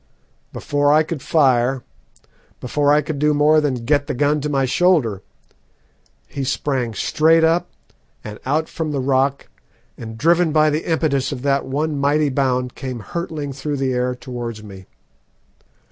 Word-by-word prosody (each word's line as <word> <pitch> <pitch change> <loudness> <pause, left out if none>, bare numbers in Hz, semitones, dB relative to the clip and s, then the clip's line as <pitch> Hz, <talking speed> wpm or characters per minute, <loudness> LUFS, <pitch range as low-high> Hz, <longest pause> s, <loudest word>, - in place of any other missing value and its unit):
Before 145 0 0
I 155 +1 +5
could 160 -3 -5
fire 130 -4 +2 0.8
before 145 +3 +1
I 150 0 +3
could 145 -1 -4
do 150 0 +2
more 155 +1 +4
than 130 -5 -2
get 145 +1 +1
the - - -3
gun 145 +3 +1
to 150 - -3
my 135 -2 +1
shoulder 130 - +2 1.1
he 140 - -5
sprang 130 -4 -2
straight 160 +5 +3
up 165 +2 +2 0.5
and 105 0 -8
out 155 +4 0
from 155 -2 -4
the 140 - -1
rock, 135 +1 0 0.5
and 110 -1 -8
driven 170 +4 +3
by 155 0 +3
the 155 +3 -2
impetus 140 -4 0
of 135 -2 -6
that 140 -1 +1
one 145 +2 -2
mighty 145 +1 +2
bound 130 -2 0
came 130 -3 -6
hurtling 150 - -5
through 145 +2 -4
the 135 -1 -1
air 125 0 -1
towards 120 -3 -7
me. 95 -3 -12
140 Hz, 160 wpm, -20 LUFS, 130-155 Hz, 1.1 s, I